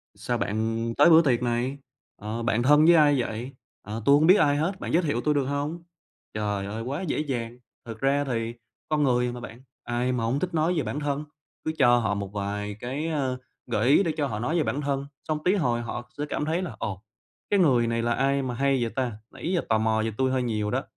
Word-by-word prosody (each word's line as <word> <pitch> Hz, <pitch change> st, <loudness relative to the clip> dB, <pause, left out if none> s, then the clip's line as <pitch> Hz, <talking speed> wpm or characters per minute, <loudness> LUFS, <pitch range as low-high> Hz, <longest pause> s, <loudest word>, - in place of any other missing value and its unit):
Sao -, -, -2 dB
bạn 115 Hz, +2 st, -1 dB
tới -, -, +7 dB
bữa 165 Hz, 0 st, +8 dB
tiệc 125 Hz, -5 st, +1 dB
này? 120 Hz, +3 st, -1 dB, 0.4 s
Ờ, 110 Hz, +2 st, -4 dB
bạn 115 Hz, 0 st, +1 dB
thân 150 Hz, +4 st, +6 dB
với 170 Hz, 0 st, +7 dB
ai 145 Hz, -4 st, +5 dB
vậy? 120 Hz, +3 st, -5 dB, 0.3 s
Ờ, 110 Hz, +2 st, -6 dB
tôi 140 Hz, -, +7 dB
hổng 155 Hz, +2 st, +4 dB
biết 185 Hz, -, +8 dB
ai 145 Hz, -6 st, +3 dB
hết, 180 Hz, +5 st, -1 dB
bạn -, -, -4 dB
giới 175 Hz, +2 st, +3 dB
thiệu 145 Hz, -6 st, 0 dB
tôi 150 Hz, -, +2 dB
được 140 Hz, -2 st, +1 dB
hông?" 145 Hz, +5 st, -3 dB, 0.5 s
Trời 105 Hz, -2 st, -2 dB
ơi! 105 Hz, +3 st, -5 dB
Quá 135 Hz, +8 st, -3 dB
dễ 175 Hz, -6 st, -2 dB
dàng! 120 Hz, -5 st, -3 dB, 0.3 s
Thực 115 Hz, -1 st, -8 dB
ra 140 Hz, +1 st, +2 dB
thì 115 Hz, -3 st, -2 dB, 0.4 s
con 150 Hz, -1 st, +2 dB
người 125 Hz, -2 st, +2 dB
mà, 125 Hz, -, -7 dB
bạn, 120 Hz, +1 st, -10 dB, 0.2 s
ai 120 Hz, +1 st, -1 dB
mà 120 Hz, -2 st, -1 dB
hông 125 Hz, +5 st, 0 dB
thích 180 Hz, +1 st, -3 dB
nói 160 Hz, +3 st, +2 dB
về 150 Hz, -, +1 dB
bản 120 Hz, +7 st, -3 dB
thân. 145 Hz, 0 st, -2 dB, 0.4 s
Cứ 155 Hz, -, 0 dB
cho 120 Hz, -3 st, +5 dB
họ 110 Hz, -4 st, 0 dB
một 100 Hz, -1 st, -3 dB
vài 105 Hz, 0 st, -3 dB
cái, 135 Hz, +6 st, -3 dB
ờ, 135 Hz, -5 st, -1 dB, 0.3 s
gợi 115 Hz, 0 st, 0 dB
ý 150 Hz, +8 st, +6 dB
để 165 Hz, -, 0 dB
cho 145 Hz, -, 0 dB
họ 105 Hz, -5 st, -4 dB
nói 155 Hz, +9 st, -1 dB
về 160 Hz, -, +2 dB
bản 135 Hz, +4 st, -2 dB
thân, 140 Hz, -1 st, -2 dB, 0.2 s
xong 155 Hz, -1 st, -2 dB
tí 185 Hz, +3 st, +3 dB
hồi 120 Hz, -10 st, 0 dB
họ 120 Hz, +1 st, -6 dB
sẽ 145 Hz, -, -2 dB
cảm 150 Hz, -, -2 dB
thấy 165 Hz, +4 st, 0 dB
là 180 Hz, -, -5 dB
"Ồ, 95 Hz, -2 st, -4 dB, 0.5 s
cái 205 Hz, -, +3 dB
người 125 Hz, -9 st, +4 dB
này 115 Hz, 0 st, 0 dB
là 120 Hz, 0 st, +1 dB
ai 135 Hz, +2 st, +1 dB
mà 125 Hz, -2 st, -3 dB
hay 135 Hz, -1 st, +1 dB
vậy 115 Hz, -, -2 dB
ta? 125 Hz, -5 st, -2 dB
Nãy 170 Hz, -, -5 dB
giờ 170 Hz, -, +1 dB
tò 110 Hz, -, +4 dB
mò 110 Hz, 0 st, +1 dB
về 110 Hz, -, -1 dB
tui 130 Hz, 0 st, +1 dB
hơi 130 Hz, -1 st, 0 dB
nhiều 105 Hz, -3 st, -1 dB
đó." -, -, 0 dB
130 Hz, 250 wpm, -26 LUFS, 115-150 Hz, 0.5 s, bữa